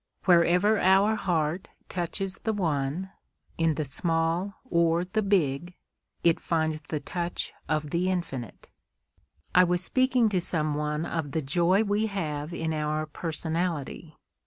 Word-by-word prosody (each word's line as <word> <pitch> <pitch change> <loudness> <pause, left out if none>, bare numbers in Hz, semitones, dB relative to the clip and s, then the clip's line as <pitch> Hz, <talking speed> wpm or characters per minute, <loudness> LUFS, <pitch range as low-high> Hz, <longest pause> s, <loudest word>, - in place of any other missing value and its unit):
Wherever 180 +4 +4
our 195 +3 +5
heart 175 -4 -1 0.2
touches 185 +2 -3
the 220 - -1
One, 165 -1 -1 0.5
in 165 -2 +2
the 155 - -2
small 165 +6 0
or 170 -4 +2
the 215 +4 -1
big, 175 -4 0 0.5
it 170 -1 +4
finds 160 -2 -1
the 155 0 -4
touch 175 +4 -4 0.2
of 150 -1 -1
the 180 +2 +1
infinite. 140 - -4 0.8
I 180 - +7
was 180 0 +1
speaking 255 +1 +3
to 185 -3 0
some 155 -3 -1
one 150 +1 -1
of 160 -5 -3
the 160 - 0
joy 175 +8 +3
we 210 +1 +1
have 155 -6 -3
in 160 -2 -2
our 155 0 -1
personality. 160 -1 -3
170 Hz, 135 wpm, -27 LUFS, 155-185 Hz, 0.8 s, I